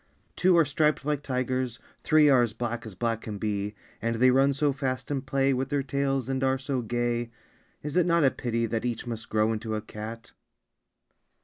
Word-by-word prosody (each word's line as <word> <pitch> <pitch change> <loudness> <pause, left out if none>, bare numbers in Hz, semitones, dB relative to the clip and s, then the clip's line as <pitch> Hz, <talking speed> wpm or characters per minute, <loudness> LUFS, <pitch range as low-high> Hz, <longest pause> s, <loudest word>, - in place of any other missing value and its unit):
Two 180 -1 +4
are 165 - +5
striped 150 0 +1
like 150 -1 0
tigers, 130 -2 -2 0.2
three 155 -1 +5
Are 135 -3 +6
as 120 -3 0
black 120 0 -4
as 105 - -9
black 115 +3 -1
can 105 -2 -6
be, 105 0 -2 0.3
And 115 +1 0
they 130 +3 +5
run 135 +2 +4
so 140 +1 +1
fast 130 0 -3
and 135 -2 -1
play 135 0 +1
With 130 +1 -2
their 140 -1 0
tails, 135 -1 -1
and 135 0 -1
are 135 0 +2
so 135 -1 -2
gay, 120 0 -1 0.5
Is 150 0 -4
it 180 -1 +3
not 170 -2 +3
a 135 - +5
pity 115 -1 -1
that 115 0 -2
Each 120 -2 -2
must 115 -2 -6
grow 110 +1 +2
into 110 0 -3
a 105 - -2
cat? 110 +2 -8
130 Hz, 205 wpm, -27 LUFS, 115-140 Hz, 0.5 s, Are